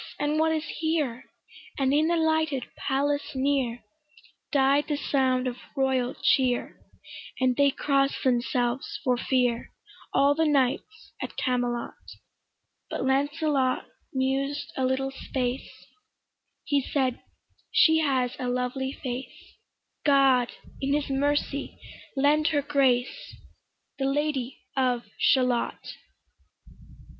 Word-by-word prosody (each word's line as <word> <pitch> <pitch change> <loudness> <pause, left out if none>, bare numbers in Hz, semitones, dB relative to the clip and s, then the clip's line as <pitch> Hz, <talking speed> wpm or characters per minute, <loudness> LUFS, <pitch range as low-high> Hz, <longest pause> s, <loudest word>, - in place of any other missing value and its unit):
and 295 +1 0
what 320 0 +3
is 315 -1 0 0.2
here? 305 -7 -1 0.5
And 270 -1 +2
in 305 +2 +3
the 340 - +2
lighted 315 -5 +1
palace 285 +1 -1
near 260 -3 0 0.7
Died 280 0 +3
the 295 - -1
sound 260 -3 +1
of 250 -1 -3 0.2
royal 260 -2 +1
cheer; 255 -3 +2 0.6
And 255 -1 +2
they 280 +1 +4
cross'd 275 0 0
themselves 245 0 0
for 250 -1 +2
fear, 245 -1 0 0.4
All 280 +1 +4
the 320 +1 +1
knights 295 - 0
at - - -6
Camelot: 245 -2 -1 1.0
But - - -3
Lancelot 280 0 +1 0.3
mused 270 +2 -1
a 260 - 0
little 265 +1 0
space; 260 -1 -3 0.9
He 285 -1 +1
said, 260 -2 -1 0.5
"She 320 0 +5
has 260 -5 +1
a 250 - -2
lovely 250 +2 -2
face; 255 0 -7 0.4
God 270 -4 +4 0.3
in 275 +1 +1
his 295 -2 -2
mercy 285 +1 -1 0.4
lend 295 +3 +3
her 295 -3 +1
grace, 270 -4 +1 0.6
The 270 - 0
Lady 275 -2 -1
of 250 -3 +1 0.2
Shalott". 250 -3 +1
270 Hz, 115 wpm, -27 LUFS, 255-290 Hz, 1.0 s, She